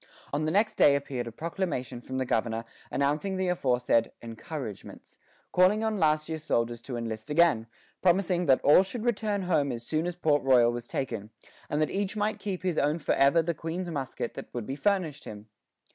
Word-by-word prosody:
On 150 +2 0
the - - +1
next 215 +4 +1
day 140 - +6
appeared 135 -4 -3
a - - -5
proclamation 155 - -4
from 130 +1 -5
the 130 - 0
governor 115 -1 -1 0.2
announcing 150 +8 0
the 185 -1 0
aforesaid 125 -8 +1
"encouragements," 115 0 -8 0.3
calling 190 +4 +4
on 220 -2 0
last 155 -1 +2
year's 160 -1 -5
soldiers 120 -3 0
to 120 0 -5
enlist 115 +1 -5
again, 150 -8 +3 0.3
promising 180 -1 +2
that 130 -1 +5
all 150 - +7
should 215 +4 -5
return 210 -4 0
home 155 -6 +1
as 120 -1 -6
soon 155 +5 -1
as 175 - -3
Port 155 -4 +2
Royal 125 -3 +5
was 120 0 -6
taken, 115 -6 -4 0.4
and 150 - 0
that 155 - -2
each 200 +1 -2
might 210 +1 -1
keep 195 -3 -4
as 185 - 0
his 170 - -3
own 150 +3 +1
forever 150 0 +3
the 170 +1 -1
Queen's 170 +3 -4
musket 135 -5 -4
that - - -9
would 120 -3 -3
be 135 - -4
furnished 180 -4 0
him. 105 0 -9
150 Hz, 195 wpm, -28 LUFS, 125-180 Hz, 0.4 s, all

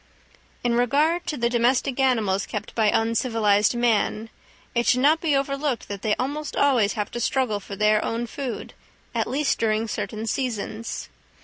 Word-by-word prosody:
In 240 -1 +1
regard 290 +9 +2
to 300 - -2
the 235 -1 +1
domestic 245 +2 +1
animals 220 -7 +1
kept 210 0 -5
by 220 -2 +3
uncivilised 225 -2 +2
man, 225 -2 +1 0.4
it 235 0 0
should 250 - +4
not 310 +4 +4
be 310 -4 +2
overlooked 275 -1 -1
that 200 -1 -5
they 210 0 +1
almost 290 +4 -3
always 245 -8 +3
have 210 -2 -3
to 240 - -4
struggle 240 -4 0
for 200 0 -8
their 210 +1 +3
own 230 +1 -2
food, 255 +1 -6 0.4
at - - 0
least 280 +2 0
during 220 0 +1
certain 215 0 -4
seasons. 230 -2 -3
235 Hz, 165 wpm, -24 LUFS, 215-270 Hz, 0.4 s, should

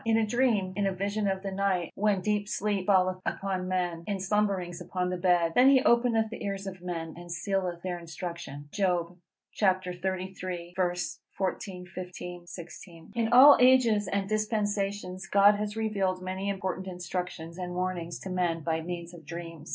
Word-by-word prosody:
In 225 -1 +3
a 225 - +3
dream, 215 -5 +1
in 200 0 +1
a - - +1
vision 200 +2 -1
of 190 0 -1
the 195 - -3
night, 190 -3 0
when 205 -2 +1
deep 210 +1 0
sleep 200 -2 -1
falleth 185 -2 +3
upon 190 -2 -2
men, 175 -2 -1
in 200 -2 -1
slumberings 190 -3 0
upon 180 +1 -2
the 180 - -2
bed: 175 -2 +3
then 255 +6 +7
he 265 -1 +5
openeth 235 -2 +3
the - - -6
ears 195 -1 -3
of 190 -2 -7
men, 165 -3 -4
and 175 0 -10
sealeth 180 -1 -2
their 180 -1 -3
instruction_." 170 -4 -7
Job 180 -4 0 0.4
xxxiii. 185 -2 -1 0.6
14, 185 -1 -3
15, 180 -1 -8
16. 170 0 -10
In 230 -1 +1
all 270 +4 +10
ages 245 -5 +5
and 200 -1 -1
dispensations 205 -3 -1
God 200 +1 +6
has 210 +1 -3
revealed 200 -4 0
many 190 +2 -3
important 190 -1 -3
instructions 180 -2 -5
and 180 -1 -4
warnings 180 -2 -2
to 190 - -6
men 175 -2 0
by 160 +1 -1
means 170 0 -6
of 170 -2 -12
dreams. 165 0 -8
185 Hz, 165 wpm, -29 LUFS, 175-205 Hz, 0.6 s, all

